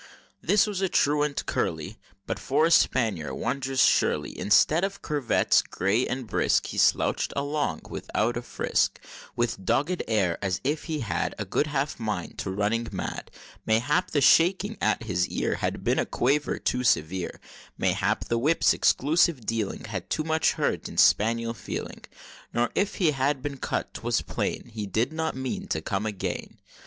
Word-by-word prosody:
This 195 +4 +4
other 210 - -1
was 195 -2 -3
a 190 - +1
truant 145 -1 +1
curly, 80 +6 -2 0.3
But, - - -3
for 145 +4 +2
a 165 - +1
spaniel, 110 - +2
wondrous 130 +2 0
surely; - - +2
Instead 155 - +3
of 195 +1 -3
curvets 145 -5 +2
gay 100 +7 0
and 130 -1 -3
brisk, - - +1
He - - -4
slouch'd - - +2
along 145 +1 -1
without 115 +3 -2
a 120 - -2
frisk, 125 - 0 0.4
With 120 -5 -1
dogged 145 - 0
air, 100 -6 +1
as 95 -3 -1
if 150 +3 -1
he 155 -3 -3
had 110 - -2
A - - -3
good 150 - 0
half 145 -2 -2
mind 105 -6 -4
to - - -3
running 105 +4 -1
mad; - - -5 0.4
Mayhap 120 +7 +2
the 145 - +1
shaking 185 - +4
at - - +1
his 90 -5 0
ear - - -1
Had - - -3
been - - +1
a - - 0
quaver 145 +4 0
too 125 - -1
severe; 90 -5 0 0.4
Mayhap - - 0
the 115 - 0
whip's 155 +7 +3
"exclusive 150 -3 +2
dealing" 110 -3 -2
Had 100 -5 -6
too 155 - -1
much 160 0 +2
hurt - - -1
e'en - - -10
spaniel 115 +2 +3
feeling, - - -6 0.5
Nor 120 +1 +1
if 200 - 0
he 170 -5 +2
had 135 -1 0
been 140 -1 -4
cut, - - -3
'twas - - -1
plain 120 - -3
He 105 -2 -4
did 115 - 0
not 160 -2 -2
mean 130 -1 -4
to 80 - -1
come 100 +6 -2
again. 105 -3 -4
125 Hz, 170 wpm, -26 LUFS, 110-150 Hz, 0.5 s, This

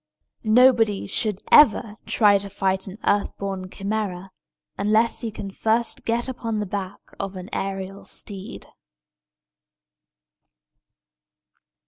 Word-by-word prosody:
Nobody 225 -2 +4
should 210 0 -1
ever 225 -6 +6
try 205 -3 +4
to 200 0 -6
fight 190 0 -1
an 190 +2 -8
earth 205 0 +1
born 195 -2 -4
Chimæra, 195 -2 -3 0.5
unless 215 +3 +2
he 230 - -3
can 205 -2 -7
first 225 +4 -1
get 235 +2 0
upon 230 -4 -3
the 210 - -1
back 200 0 -4 0.2
of 195 -1 -4
an 185 +1 -8
aërial 195 0 -4
steed. 195 -2 -7
205 Hz, 110 wpm, -23 LUFS, 195-220 Hz, 0.5 s, ever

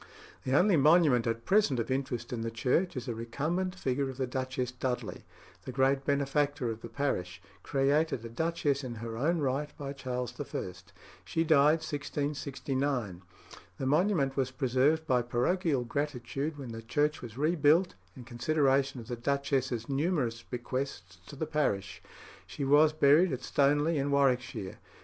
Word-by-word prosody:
The 130 +2 +3
only 185 0 +4
monument 150 -5 +5
at 115 0 -2
present 195 - +3
of 115 +2 -2
interest 130 -3 -2
in 115 - -3
the 115 - -2
church 130 +9 0
is 120 - -5
a 120 - -2
recumbent 155 +11 -2
figure 135 -4 -1
of 130 - -8
the 130 - 0
Duchess 130 0 -3
Dudley, 125 -2 -4 0.4
the - - -6
great 135 +2 +1
benefactor 140 -2 0
of 110 0 -7
the - - -8
parish, 95 -10 -2 0.2
created 140 -2 +1
a - - -6
duchess 145 +1 -1
in 125 -2 -5
her 115 0 -6
own 155 +9 +1
right 140 +2 -1
by 140 -1 -5
Charles 125 -3 -4
I. 115 -9 -4 0.5
She 165 - -1
died 155 0 +4
1669. 140 - -2 0.6
The 135 - -3
monument 150 -2 +2
was 130 -2 0
preserved 130 +5 +1
by 125 -5 +2
parochial 130 +4 0
gratitude 140 +3 -3
when 130 -4 -7
the 115 0 -7
church 150 +6 0
was 120 -1 -9
rebuilt, 155 +3 +3 0.2
in 125 - -9
consideration 135 +2 +1
of 115 - -10
the 120 - -3
duchess's 130 -2 -1
numerous 140 -5 0
bequests 120 -8 -5
to - - -9
the 160 - -2
parish. 140 -11 -1 0.5
She 140 - -4
was 150 +3 +5
buried 155 +3 +4
at 130 - -4
Stoneleigh 145 +3 +2
in 140 - -1
Warwickshire. 125 -8 0
135 Hz, 160 wpm, -30 LUFS, 125-150 Hz, 0.6 s, monument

